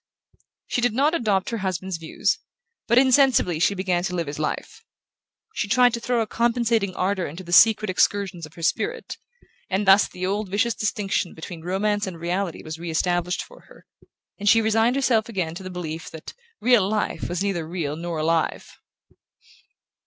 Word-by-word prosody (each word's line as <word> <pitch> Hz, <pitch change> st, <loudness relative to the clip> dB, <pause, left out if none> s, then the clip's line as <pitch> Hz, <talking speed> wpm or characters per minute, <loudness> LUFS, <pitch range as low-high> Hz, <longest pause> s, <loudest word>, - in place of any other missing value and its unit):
She 245 Hz, -, -1 dB
did 240 Hz, -2 st, +2 dB
not 290 Hz, +5 st, +3 dB
adopt 210 Hz, -, 0 dB
her 230 Hz, -, -2 dB
husband's 190 Hz, -1 st, -3 dB
views, 165 Hz, -1 st, -1 dB, 0.5 s
but 235 Hz, -, +3 dB
insensibly 260 Hz, -, +4 dB
she 200 Hz, +4 st, +2 dB
began 185 Hz, -2 st, 0 dB
to 180 Hz, -, -3 dB
live 170 Hz, -1 st, -1 dB
his 145 Hz, +1 st, -6 dB
life. 155 Hz, -, -4 dB, 0.7 s
She 215 Hz, -, -2 dB
tried 245 Hz, +3 st, +4 dB
to 235 Hz, -, -2 dB
throw 240 Hz, 0 st, 0 dB
a -, -, 0 dB
compensating 230 Hz, -4 st, 0 dB
ardour 185 Hz, -1 st, -1 dB
into 165 Hz, +6 st, -8 dB
the 175 Hz, 0 st, -6 dB
secret 215 Hz, +2 st, +6 dB
excursions 185 Hz, -2 st, 0 dB
of 155 Hz, -, -21 dB
her 165 Hz, -, -9 dB
spirit, 165 Hz, -, -1 dB, 0.5 s
and 195 Hz, +2 st, 0 dB
thus 195 Hz, +1 st, +6 dB
the 180 Hz, 0 st, -5 dB
old 200 Hz, +1 st, -2 dB
vicious 225 Hz, +5 st, +1 dB
distinction 210 Hz, -5 st, -2 dB
between 165 Hz, +1 st, -8 dB
romance 205 Hz, +4 st, -1 dB
and 175 Hz, -3 st, -7 dB
reality 175 Hz, +1 st, -2 dB
was 155 Hz, +1 st, -7 dB
re 170 Hz, 0 st, -5 dB
established 175 Hz, +2 st, 0 dB
for -, -, -17 dB
her, -, -, -18 dB, 0.5 s
and 205 Hz, 0 st, +2 dB
she 225 Hz, -, +6 dB
resigned 225 Hz, +2 st, +2 dB
herself 235 Hz, -5 st, +2 dB
again 180 Hz, -7 st, -2 dB
to 175 Hz, -, -8 dB
the 185 Hz, -, -7 dB
belief 165 Hz, -3 st, -6 dB
that 160 Hz, -, -10 dB, 0.3 s
"real 235 Hz, -6 st, +4 dB
life" 215 Hz, 0 st, -2 dB
was 175 Hz, +2 st, -2 dB
neither 175 Hz, -5 st, -2 dB
real 160 Hz, -4 st, -3 dB
nor 170 Hz, 0 st, -4 dB
alive. 160 Hz, +1 st, -1 dB
190 Hz, 180 wpm, -24 LUFS, 170-220 Hz, 0.7 s, secret